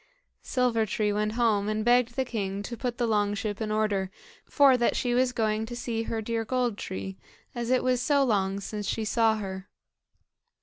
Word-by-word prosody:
Silver 240 Hz, -4 st, +1 dB
tree 210 Hz, 0 st, 0 dB
went 210 Hz, +1 st, -1 dB
home, 220 Hz, -3 st, +2 dB
and 215 Hz, 0 st, -1 dB
begged 245 Hz, 0 st, +3 dB
the 265 Hz, -, 0 dB
king 200 Hz, -4 st, -3 dB
to 235 Hz, -, -5 dB
put 240 Hz, -1 st, -3 dB
the 240 Hz, -, +1 dB
long 205 Hz, -2 st, +1 dB
ship 210 Hz, +1 st, -4 dB
in 215 Hz, -, -2 dB
order, 210 Hz, -3 st, 0 dB, 0.4 s
for 280 Hz, -3 st, +5 dB
that 240 Hz, -1 st, +1 dB
she 245 Hz, -1 st, 0 dB
was 250 Hz, +1 st, +3 dB
going 220 Hz, -2 st, 0 dB
to 240 Hz, -, -6 dB
see 235 Hz, -2 st, -3 dB
her 225 Hz, -1 st, -3 dB
dear 230 Hz, +1 st, -1 dB
Gold 245 Hz, -1 st, 0 dB
tree, 95 Hz, -, -6 dB, 0.3 s
as 240 Hz, -2 st, -4 dB
it 255 Hz, 0 st, +2 dB
was 255 Hz, -1 st, +1 dB
so 280 Hz, +1 st, +3 dB
long 200 Hz, -5 st, +1 dB
since 205 Hz, +1 st, -5 dB
she 225 Hz, -, -1 dB
saw 225 Hz, 0 st, +3 dB
her. 190 Hz, -2 st, -6 dB
225 Hz, 200 wpm, -27 LUFS, 205-245 Hz, 0.4 s, for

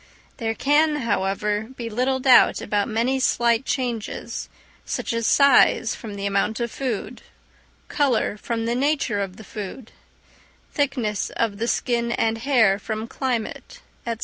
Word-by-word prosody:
There 225 Hz, -3 st, -2 dB
can, 300 Hz, +4 st, +3 dB
however, 210 Hz, 0 st, -1 dB
be 235 Hz, -2 st, -5 dB
little 255 Hz, +4 st, 0 dB
doubt 255 Hz, -1 st, +5 dB
about 205 Hz, -1 st, -1 dB
many 235 Hz, +4 st, 0 dB
slight 235 Hz, -1 st, +2 dB
changes, 240 Hz, -5 st, -3 dB, 0.3 s
such -, -, -3 dB
as 230 Hz, -1 st, 0 dB
size 275 Hz, -5 st, +5 dB
from 215 Hz, -3 st, -8 dB
the 200 Hz, 0 st, -4 dB
amount 200 Hz, +3 st, 0 dB
of 235 Hz, -1 st, -2 dB
food, 250 Hz, -2 st, -4 dB, 0.7 s
colour 265 Hz, -8 st, +1 dB
from 225 Hz, +1 st, -3 dB
the 235 Hz, -, 0 dB
nature 265 Hz, -5 st, 0 dB
of 190 Hz, -2 st, -5 dB
the 220 Hz, -, -11 dB
food, 215 Hz, +3 st, -8 dB, 0.8 s
thickness 255 Hz, -8 st, -1 dB
of 215 Hz, -3 st, -2 dB
the 230 Hz, -, -1 dB
skin 235 Hz, -1 st, 0 dB
and 225 Hz, -1 st, 0 dB
hair 225 Hz, -6 st, +3 dB
from 220 Hz, 0 st, -4 dB
climate, 255 Hz, -, -4 dB, 0.3 s
&c. 230 Hz, -, -1 dB
230 Hz, 145 wpm, -23 LUFS, 215-255 Hz, 0.8 s, doubt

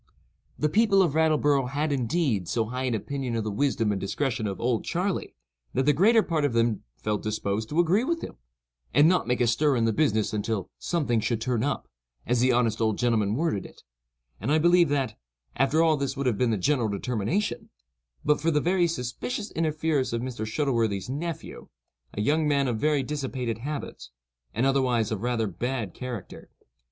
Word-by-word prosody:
The 150 Hz, -, +1 dB
people 200 Hz, +2 st, +4 dB
of 165 Hz, -6 st, 0 dB
Rattleborough 150 Hz, -4 st, +2 dB
had, 145 Hz, +3 st, -1 dB
indeed, 130 Hz, -, 0 dB
so 115 Hz, -2 st, 0 dB
high 125 Hz, +3 st, -3 dB
an 125 Hz, -3 st, 0 dB
opinion 130 Hz, +2 st, -3 dB
of 115 Hz, -, -1 dB
the 110 Hz, -, -3 dB
wisdom 115 Hz, -2 st, +1 dB
and 100 Hz, -, -2 dB
discretion 115 Hz, +2 st, -1 dB
of 95 Hz, -2 st, -4 dB
"Old 120 Hz, -2 st, 0 dB
Charley," 185 Hz, +3 st, -2 dB, 0.4 s
that 130 Hz, -, +2 dB
the 150 Hz, -, +5 dB
greater 220 Hz, +8 st, +5 dB
part 160 Hz, -4 st, -1 dB
of 145 Hz, -4 st, +1 dB
them 115 Hz, -2 st, +1 dB, 0.2 s
felt 105 Hz, -1 st, -2 dB
disposed 110 Hz, 0 st, -2 dB
to 155 Hz, -, 0 dB
agree 175 Hz, +7 st, +3 dB
with 335 Hz, +4 st, -1 dB
him, -, -, -7 dB, 0.6 s
and 150 Hz, -, +7 dB
not 180 Hz, +1 st, +2 dB
make 125 Hz, 0 st, 0 dB
a -, -, +4 dB
stir 135 Hz, +5 st, +2 dB
in 115 Hz, -2 st, +2 dB
the 115 Hz, -, +1 dB
business 110 Hz, -7 st, +1 dB
"until 105 Hz, -2 st, -2 dB
something 145 Hz, -10 st, 0 dB
should 110 Hz, +1 st, -1 dB
turn 120 Hz, -1 st, -1 dB
up," 145 Hz, -, -2 dB, 0.4 s
as 125 Hz, 0 st, +1 dB
the 130 Hz, +2 st, +4 dB
honest 115 Hz, -2 st, +1 dB
old 110 Hz, -2 st, +1 dB
gentleman 110 Hz, -4 st, +1 dB
worded 140 Hz, -, 0 dB
it; -, -, -14 dB, 0.6 s
and 115 Hz, +9 st, -2 dB
I 155 Hz, -, +5 dB
believe 175 Hz, 0 st, +4 dB
that, 135 Hz, -, -1 dB, 0.4 s
after 135 Hz, +5 st, +3 dB
all 160 Hz, -2 st, +3 dB
this 140 Hz, 0 st, -2 dB
would 140 Hz, -, -2 dB
have 125 Hz, -4 st, +2 dB
been 125 Hz, +3 st, +1 dB
the 110 Hz, -, +1 dB
general 120 Hz, +2 st, +1 dB
determination, 125 Hz, -, -2 dB, 0.6 s
but 150 Hz, -, +2 dB
for 165 Hz, -, +2 dB
the 150 Hz, -2 st, +2 dB
very 175 Hz, +2 st, +2 dB
suspicious 170 Hz, -, -4 dB
interference 155 Hz, -4 st, 0 dB
of 115 Hz, +1 st, -1 dB
Mr. 120 Hz, -4 st, -4 dB
Shuttleworthy's 115 Hz, -6 st, 0 dB
nephew, 165 Hz, +3 st, -5 dB, 0.5 s
a 105 Hz, -, -1 dB
young 150 Hz, +7 st, +2 dB
man 140 Hz, -2 st, +2 dB
of 115 Hz, -3 st, -1 dB
very 150 Hz, -1 st, +2 dB
dissipated 130 Hz, -5 st, -3 dB
habits, 145 Hz, -, -6 dB, 0.4 s
and 120 Hz, +4 st, 0 dB
otherwise 125 Hz, -5 st, +2 dB
of 105 Hz, -3 st, -2 dB
rather 120 Hz, -2 st, 0 dB
bad 115 Hz, +1 st, -3 dB
character. 125 Hz, -6 st, -7 dB
130 Hz, 190 wpm, -26 LUFS, 115-150 Hz, 0.6 s, and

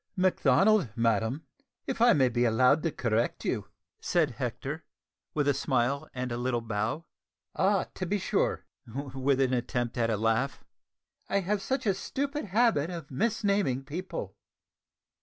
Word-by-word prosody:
"Macdonald, 185 Hz, -, +3 dB
madam, 115 Hz, +5 st, +1 dB, 0.4 s
if 260 Hz, -, -3 dB
I 240 Hz, 0 st, +7 dB
may 135 Hz, -3 st, +4 dB
be 120 Hz, 0 st, +1 dB
allowed 125 Hz, +6 st, +4 dB
to 165 Hz, -, 0 dB
correct 115 Hz, -2 st, -1 dB
you," 105 Hz, -5 st, -1 dB, 0.3 s
said 160 Hz, -5 st, +1 dB
Hector, 135 Hz, +5 st, -4 dB, 0.5 s
with 145 Hz, -2 st, +1 dB
a 145 Hz, -, +4 dB
smile 135 Hz, +2 st, 0 dB
and 125 Hz, -1 st, -4 dB
a 120 Hz, -, -2 dB
little 120 Hz, 0 st, 0 dB
bow. 115 Hz, +8 st, -2 dB, 0.5 s
"Ah, 195 Hz, 0 st, +3 dB
to 185 Hz, -, -4 dB
be 205 Hz, +4 st, +1 dB
sure!" 195 Hz, -, 0 dB, 0.2 s
(with 135 Hz, +2 st, -1 dB
an 130 Hz, -1 st, +2 dB
attempt 120 Hz, 0 st, -1 dB
at 115 Hz, -1 st, +2 dB
a 110 Hz, -, +1 dB
laugh.) 115 Hz, +5 st, 0 dB, 0.7 s
"I 200 Hz, -, +2 dB
have 200 Hz, +2 st, -1 dB
such 265 Hz, +4 st, -2 dB
a 200 Hz, -, +3 dB
stupid 280 Hz, +8 st, -3 dB
habit 210 Hz, -6 st, +2 dB
of 165 Hz, -5 st, -7 dB
misnaming 200 Hz, -, 0 dB
people." 150 Hz, -, -5 dB
140 Hz, 150 wpm, -29 LUFS, 120-185 Hz, 0.7 s, I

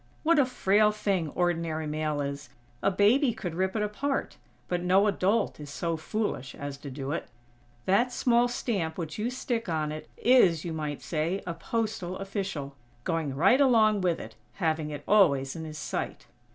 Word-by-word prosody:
What 330 Hz, -1 st, +4 dB
a 270 Hz, -, +4 dB
frail 210 Hz, -3 st, +3 dB
thing 195 Hz, -6 st, -1 dB
ordinary 165 Hz, -3 st, 0 dB
mail 150 Hz, -1 st, -1 dB
is! 140 Hz, 0 st, -5 dB, 0.3 s
A -, -, +3 dB
baby 225 Hz, +7 st, +4 dB
could 180 Hz, -7 st, -4 dB
rip 190 Hz, +2 st, -1 dB
it 215 Hz, -, +1 dB
apart, 270 Hz, +7 st, -2 dB, 0.3 s
but 180 Hz, -1 st, -1 dB
no 185 Hz, +3 st, +4 dB
adult 205 Hz, -1 st, +1 dB
is 145 Hz, -1 st, -8 dB
so 165 Hz, +3 st, -2 dB
foolish 160 Hz, -, -3 dB
as 140 Hz, 0 st, -5 dB
to 145 Hz, -, -7 dB
do 135 Hz, +1 st, -5 dB
it. 165 Hz, -, -3 dB, 0.6 s
That 235 Hz, +7 st, +3 dB
small 245 Hz, -1 st, +3 dB
stamp 195 Hz, -9 st, -2 dB
which 165 Hz, +1 st, -5 dB
you 225 Hz, +3 st, 0 dB
stick 240 Hz, -4 st, -3 dB
on 155 Hz, -2 st, -1 dB
it, 155 Hz, 0 st, -7 dB
is, 190 Hz, -11 st, +4 dB
you 165 Hz, -, -3 dB
might 150 Hz, -2 st, -4 dB
say, 170 Hz, +4 st, -1 dB
a 170 Hz, -, -3 dB
postal 210 Hz, 0 st, -3 dB
official, 195 Hz, -8 st, -4 dB, 0.3 s
going 160 Hz, -4 st, -1 dB
right 195 Hz, -, +5 dB
along 220 Hz, -6 st, +4 dB
with 175 Hz, -2 st, +1 dB
it, -, -, -8 dB, 0.2 s
having 160 Hz, -4 st, -1 dB
it 145 Hz, -1 st, -6 dB
always 140 Hz, -10 st, +4 dB
in 160 Hz, -1 st, -5 dB
his 155 Hz, -1 st, -7 dB
sight." -, -, -4 dB
180 Hz, 180 wpm, -28 LUFS, 155-215 Hz, 0.6 s, right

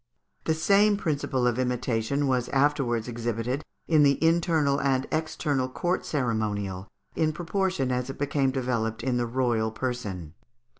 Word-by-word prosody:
The 160 Hz, -, +2 dB
same 200 Hz, +6 st, +4 dB
principle 145 Hz, -8 st, -1 dB
of 125 Hz, 0 st, +1 dB
imitation 125 Hz, +2 st, 0 dB
was 125 Hz, -2 st, 0 dB
afterwards 135 Hz, -5 st, +1 dB
exhibited 120 Hz, +3 st, -2 dB, 0.2 s
in 155 Hz, -2 st, +4 dB
the 140 Hz, -1 st, +5 dB
internal 160 Hz, -4 st, +2 dB
and 135 Hz, -1 st, +1 dB
external 145 Hz, -4 st, -1 dB
court 175 Hz, +7 st, -1 dB
ceremonial, 105 Hz, -7 st, -2 dB, 0.3 s
in 155 Hz, -1 st, +2 dB
proportion 175 Hz, -5 st, -1 dB
as 125 Hz, +1 st, -1 dB
it 135 Hz, -, -6 dB
became 140 Hz, -1 st, +1 dB
developed 120 Hz, -4 st, -2 dB
in 130 Hz, -2 st, 0 dB
the 120 Hz, -1 st, 0 dB
royal 120 Hz, -3 st, +1 dB
person. 110 Hz, -9 st, -4 dB
130 Hz, 140 wpm, -27 LUFS, 120-150 Hz, 0.3 s, the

